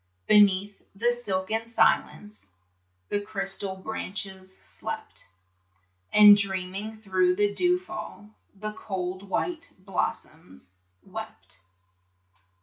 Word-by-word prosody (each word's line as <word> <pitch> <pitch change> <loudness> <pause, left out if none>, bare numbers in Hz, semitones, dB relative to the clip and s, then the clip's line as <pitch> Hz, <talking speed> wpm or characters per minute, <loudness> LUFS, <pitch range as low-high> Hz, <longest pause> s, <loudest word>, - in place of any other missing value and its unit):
Beneath 205 -1 +4
the 235 +4 +2
silken 220 -1 -2
silence 210 - +1 0.6
The 205 - 0
crystal 195 -2 -3
branches 190 -1 -6
slept, - - -7 0.8
And 210 -1 +10
dreaming 195 +2 -2
thro' 185 -4 +2
the 205 +1 +2
dew 360 - +3
fall 360 - -9 0.2
The 215 +2 -4
cold 185 -3 -4
white 330 - -3
blossoms 180 - -3 0.3
wept. 185 - -8
200 Hz, 90 wpm, -27 LUFS, 190-215 Hz, 0.8 s, And